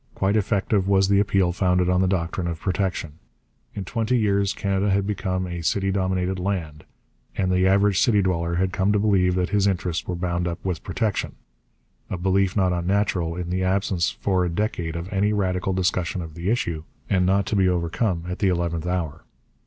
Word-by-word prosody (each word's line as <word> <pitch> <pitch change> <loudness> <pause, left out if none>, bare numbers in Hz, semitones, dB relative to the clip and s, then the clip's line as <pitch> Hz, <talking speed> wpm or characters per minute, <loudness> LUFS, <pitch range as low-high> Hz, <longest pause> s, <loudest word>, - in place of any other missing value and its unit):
Quite 100 +2 +1
effective 100 -1 +1
was 95 -1 +3
the 100 0 +4
appeal 95 -3 +2
founded 90 0 +1
on 90 0 +2
the 95 - +2
doctrine 90 -1 -1
of 85 -2 -4
protection. 90 -5 -2 0.6
In 100 - -4
twenty 115 +5 0
years 100 -3 +2
Canada 100 0 0
had 100 0 +2
become 95 -2 -2
a 85 -1 -5
city 95 +3 0
dominated 95 -1 -1
land, 85 -6 -3 0.5
and 95 -1 +1
the 90 +1 +3
average 100 0 +3
city 110 -4 +4
dweller 85 -2 0
had 95 +1 0
come 95 +1 +1
to - - +3
believe 95 -4 +2
that 90 0 0
his 100 -1 +2
interests 90 -3 -1
were 90 - -2
bound 85 0 -1
up 85 -1 -3
with 90 -6 -2
protection 110 -3 -2 0.7
a 95 - -3
belief 95 +1 +1
not 95 -3 +2
unnatural 90 -1 0
in 90 0 -4
the 95 +1 0
absence 95 -2 +1
for 95 -2 0
a 90 - 0
decade 85 -3 -2
of 85 +1 -4
any 100 +2 +2
radical 95 -2 0
discussion 90 -1 -1
of 80 -1 -9
the 85 +4 -3
issue, 85 -9 -1 0.2
and 95 -2 +2
not 100 +1 +2
to 105 - -2
be 95 -2 +3
overcome 85 +1 -1
at 90 +1 -4
the 100 - +2
eleventh 85 -2 -1
hour. 85 -3 -3
95 Hz, 195 wpm, -24 LUFS, 90-100 Hz, 0.7 s, the